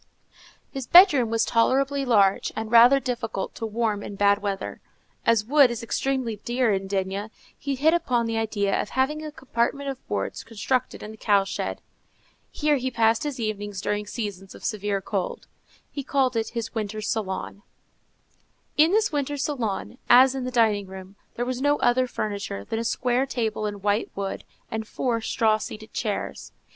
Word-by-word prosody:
His 270 -4 -6
bedroom 300 - +7
was 225 0 +1
tolerably 270 +4 +2
large, 200 -6 +3
and 220 0 -4
rather 240 +4 +7
difficult 235 -6 -3
to 225 - -4
warm 215 -2 -1
in 205 - -7
bad 200 +1 +3
weather. 200 -1 -4 0.5
As 230 -2 +4
wood 280 +1 +5
is 235 -1 -5
extremely 255 -2 -1
dear 240 +1 0
at 195 0 -2
D——, 195 +1 -2 0.3
he 280 -1 -3
hit 305 +5 +3
upon 250 -9 +1
the 225 0 -2
idea 210 -3 0
of - - -6
having 295 +4 0
a 305 - -6
compartment 270 0 -2
of 265 - -12
boards - - -3
constructed 250 +3 -2
in 210 - -7
the 220 - -12
cow 200 -2 +3
shed. 195 - -4 0.7
Here 300 -1 +1
he 260 0 -2
passed 230 -2 +2
his 290 -4 -4
evenings 205 -3 -3
during 205 +1 -2
seasons 200 -3 -6
of - - -11
severe 205 -2 -1
cold: 190 -1 -3 0.5
he 280 - -4
called 265 -2 +1
it 225 -1 -1
his 225 -1 -3
winter 215 -1 -3
salon. 200 -2 -3 1.2
In 315 +4 +5
this 430 -2 +3
winter 290 -1 -2
salon, 245 -5 -3
as 255 +2 +7
in 265 -2 -3
the - - -2
dining 220 -5 +2
room, 190 +1 -10 0.2
there 240 - -2
was 255 0 -3
no 290 +1 +3
other 255 +1 +2
furniture 200 - -4
than 225 - -3
a - - -2
square 250 +3 0
table 220 -4 -2
in 205 -2 -6
white 205 +2 +1
wood, 195 -1 -4 0.3
and 220 -1 -3
four 235 -2 -1
straw 220 -1 +2
seated 215 +1 -8
chairs. 210 -3 -4
230 Hz, 175 wpm, -25 LUFS, 205-260 Hz, 1.2 s, bedroom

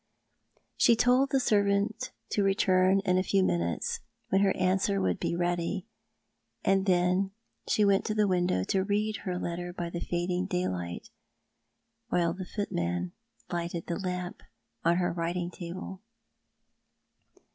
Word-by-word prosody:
She 235 - +6
told 250 +4 +4
the 270 - +2
servant 205 -1 +1 0.2
to 205 - +2
return 195 -1 +3
in 185 -2 +2
a - - +1
few 195 0 +2
minutes, 85 - 0 0.3
when 195 - +3
her 195 -1 +4
answer 190 +2 +2
would 190 - 0
be - - -1
ready; 175 +1 -1 0.8
and 195 0 +3
then 180 +1 +3 0.4
she 210 - +3
went 200 0 +4
to 215 - -1
the 210 -1 +3
window 175 - +1
to 190 - +1
read 210 +2 0
her 180 -2 -1
letter 175 0 -3
by 175 -1 -4
the 170 - -4
fading 180 +1 -1
daylight, 90 - -3 1.0
while 170 -1 +2
the 185 0 -7
footman 90 - -2 0.4
lighted 170 -1 -3
the 170 - -3
lamp 180 -2 -4 0.4
on 170 +1 +3
her 175 -2 +1
writing 175 +1 -2
table. 185 +1 -7
185 Hz, 140 wpm, -29 LUFS, 175-195 Hz, 1.0 s, She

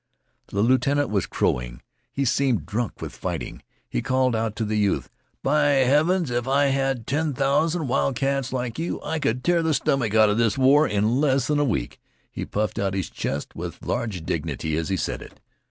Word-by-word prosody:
The 100 +1 0
lieutenant 130 +2 +2
was 100 -4 0
crowing. - - -1 0.3
He 140 - -1
seemed 130 -1 +1
drunk 115 0 -3
with - - -6
fighting. - - -5 0.3
He - - -2
called 130 -1 +1
out 110 -1 -1
to 110 - -2
the 105 0 0
youth: 100 -2 0 0.3
"By 150 +2 +3 0.2
heavens, 155 +4 +2
if 120 +1 -1
I 140 +2 +3
had 135 -4 -1
ten 150 0 -1
thousand 150 +4 +1
wild 130 +1 +1
cats 135 -1 -1
like 125 0 -3
you 170 - -2
I 160 +1 -2
could 125 -3 -1
tear 175 -1 +3
th' 160 -2 +1
stomach 120 -8 0
outa 110 -1 +5
this 115 0 +1
war 140 +4 +5
in 110 +6 +1
less'n 145 0 +2
a - - +3
week!" 130 -6 -2 0.3
He - - -5
puffed 105 +1 -2
out 95 -1 -1
his 95 -4 -3
chest 70 +1 -4
with - - -7
large 100 -8 -2
dignity 80 +1 -2
as 80 +2 -2
he 95 - 0
said - - -3
it. - - -13
130 Hz, 190 wpm, -24 LUFS, 110-140 Hz, 0.3 s, outa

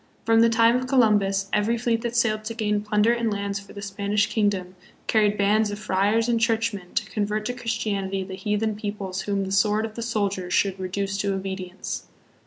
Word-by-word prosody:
From 225 0 +5
the 230 - +6
time 230 +1 +4
of 255 0 -3
Columbus, 205 -7 +3
every 215 +3 +2
fleet 230 -1 0
that 235 0 -3
sailed 215 -2 +2
to 230 +1 -4
gain 210 -2 0
plunder 210 +2 +2
and 235 -2 0
lands 200 -1 -2
for 200 - -14
the 200 - -8
Spanish 200 +1 0
kingdom 195 -5 -1 0.3
carried 210 -2 +2
bands 210 +2 +3
of 205 - -4
friars 210 +3 +1
and 235 -1 +2
churchmen 225 -5 -1
to - - 0
convert 210 0 -1
to 245 - -1
Christianity 210 -5 -2
the 190 0 -8
heathen 210 +3 -1
peoples 205 -3 -4
whom 200 -1 -1
the 190 - -5
sword 210 +3 +2
of 220 - -7
the 235 - -6
soldier 200 -5 -1
should 195 +1 +1
reduce 195 +1 -2
to 200 -1 0
obedience. 190 -1 -5
210 Hz, 195 wpm, -24 LUFS, 195-225 Hz, 0.3 s, the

